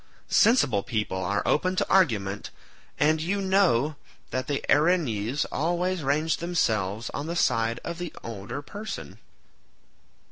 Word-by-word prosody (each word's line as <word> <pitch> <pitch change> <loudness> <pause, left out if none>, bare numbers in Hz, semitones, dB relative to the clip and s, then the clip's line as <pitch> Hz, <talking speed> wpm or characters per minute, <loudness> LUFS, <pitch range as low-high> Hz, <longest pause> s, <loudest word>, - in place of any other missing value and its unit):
Sensible 175 - +4
people 100 -3 -2
are 100 +3 -1
open 185 +5 +2
to - - 0
argument, 105 - +1 0.5
and 155 +1 +3
you 190 +5 -1
know 180 -8 +2 0.3
that 130 0 -2
the 145 -1 -2
Erinyes 145 - +2
always 175 +3 0
range 155 +3 +1
themselves 110 - -1
on 145 - -4
the 170 - -3
side 115 -6 +1
of 170 - -5
the 175 -2 -4
older 115 +5 -6
person." 210 +8 -7
145 Hz, 130 wpm, -26 LUFS, 115-175 Hz, 0.5 s, Sensible